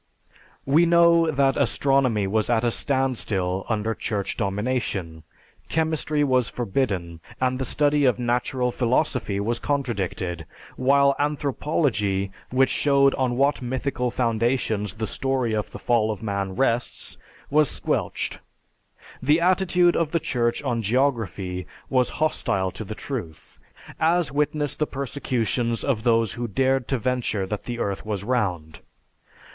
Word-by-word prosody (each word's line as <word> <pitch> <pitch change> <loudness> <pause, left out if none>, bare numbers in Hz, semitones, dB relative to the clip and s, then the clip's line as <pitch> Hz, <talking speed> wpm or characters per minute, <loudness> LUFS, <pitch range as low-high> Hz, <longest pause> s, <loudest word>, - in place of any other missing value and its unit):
We 155 +5 +4
know 170 -1 +5
that 140 -2 +2
astronomy 135 -5 +2
was 110 +3 0
at 115 -1 +2
a 120 - +2
standstill 110 -9 0
under 110 0 0
Church 105 -3 -3
domination, 100 -5 -2 0.5
chemistry 155 -2 0
was 130 -4 +2
forbidden, 95 -8 -2 0.2
and 130 0 0
the 130 - -1
study 145 +1 +2
of 125 - +3
natural 125 +1 0
philosophy 125 -4 0
was 115 +3 -1
contradicted; 100 - -2 0.3
while 140 +1 +4
anthropology, 135 - 0 0.2
which 130 +1 +3
showed 140 -1 +3
on 125 -2 0
what 140 +1 +2
mythical 125 0 -2
foundations 115 -3 0
the 110 0 -3
story 130 +1 -1
of 105 -1 -1
the - - -9
fall 115 -3 +1
of 110 +1 -4
man 100 -2 -2
rests, 120 -2 -1 0.4
was 150 -1 +4
squelched. - - -2 0.8
The 150 +5 +3
attitude 180 0 +3
of 165 -3 +1
the 165 - 0
Church 120 -6 -1
on 115 -1 -1
geography 110 -7 -1 0.2
was 130 -2 +3
hostile 95 -11 0
to 110 - -7
the 110 +1 -7
truth, 105 - -7 0.4
as 165 -1 +2
witness 145 0 0
the 150 - -1
persecutions 125 -3 -1
of 130 -6 0
those 115 -1 +2
who 120 0 -3
dared 130 +3 +1
to 135 - 0
venture 120 -4 -1
that 105 +2 -5
the 120 -1 -4
earth 100 -4 -2
was 105 -3 -3
round. 95 -10 -2
125 Hz, 135 wpm, -24 LUFS, 105-140 Hz, 0.8 s, know